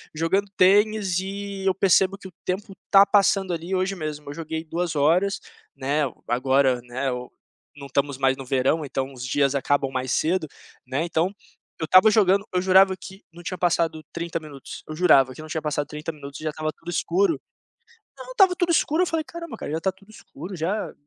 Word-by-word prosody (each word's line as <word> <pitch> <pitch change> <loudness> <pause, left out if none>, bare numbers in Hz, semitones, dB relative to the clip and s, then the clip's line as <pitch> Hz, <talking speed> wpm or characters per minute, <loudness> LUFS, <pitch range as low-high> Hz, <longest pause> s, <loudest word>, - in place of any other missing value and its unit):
jogando 190 +6 0
tênis 200 -1 +3
e 195 0 -5
eu 190 - +3
percebo 195 0 +3
que 195 - -11
o - - -20
tempo 195 +1 -3 0.2
tá 195 0 +8
passando, 195 -2 +3
ali. 170 +3 -3
Hoje 185 +1 0
mesmo, 150 -4 -6
eu - - -5
joguei 160 0 -5
2 165 0 -3
horas, 175 +7 +2 0.3
né, 145 +3 0 0.2
agora, 130 +1 +2
né, 130 +2 -3
ou 125 0 -5 0.5
não 140 -1 -9
estamos 140 0 -1
mais 135 0 +2
no 135 - -8
verão, 135 +5 +1
então 135 0 -3
os 125 -1 -7
dias 140 +1 +1
acabam 140 0 +1
mais 130 0 -3
cedo, 165 +2 +1 0.4
né? 135 +5 -1
Então, 170 +3 0 0.5
eu - - 0
estava 185 +6 +7
jogando, 200 -2 +3
eu 180 - +2
jurava 190 +1 +5
que 190 +3 -12
não 175 +1 -13
tinha 185 +2 -4
passado 170 -2 +1
30 170 0 -3
minutos, 145 -4 -10
eu 155 - -6
jurava 140 -7 +4
que 155 - -10
não 155 - -9
tinha 160 -1 -3
passado 150 -1 -1
30 150 +2 -5
minutos 140 -1 -10
e - - -10
já - - +1
estava 155 0 -3
tudo 170 - -11
escuro. 350 - +1 0.8
Não, - - -9
estava 385 -6 +5
tudo 350 -1 -1
escuro. 325 +1 +2
Eu - - -1
falei: 325 -1 -1
"Caramba, 335 0 -8
cara, 180 - -6
já 160 - -1
tá 190 +3 -1
tudo 195 +2 -23
escuro, 195 -2 -10
já. 185 +5 -2
170 Hz, 200 wpm, -24 LUFS, 145-195 Hz, 0.8 s, tá